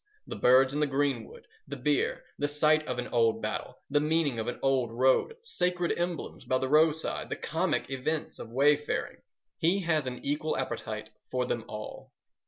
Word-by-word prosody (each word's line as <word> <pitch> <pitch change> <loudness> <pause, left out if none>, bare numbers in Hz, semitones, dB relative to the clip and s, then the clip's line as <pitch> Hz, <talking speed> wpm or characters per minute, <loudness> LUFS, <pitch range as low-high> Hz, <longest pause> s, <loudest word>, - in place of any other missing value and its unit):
The - - -6
birds 130 +2 +5
in 145 - -1
the 150 - +2
greenwood, 135 -4 -2 0.2
the 140 - -5
beer, 145 +2 0 0.2
the 145 - +1
site 150 +1 +3
of 125 - -2
an 125 - -3
old 115 -2 +2
battle, 110 0 -4
the 145 +1 +2
meaning 150 -4 +1
of 110 - -3
an 120 - -3
old 130 -4 +2
road, 130 - +2
sacred 180 - 0
emblems 175 0 -3
by 130 - +1
the 130 - -1
roadside, 155 +1 +2
the - - -2
comic - - -1
events 145 +4 -2
of 115 - -7
way 140 +5 +5
faring—he 165 +4 -3
has 160 -6 +1
an 125 -1 -6
equal 150 +2 -1
appetite 110 -4 -4 0.2
for 125 -1 0
them 120 -2 -2
all. 105 0 -8
140 Hz, 180 wpm, -29 LUFS, 125-155 Hz, 0.2 s, birds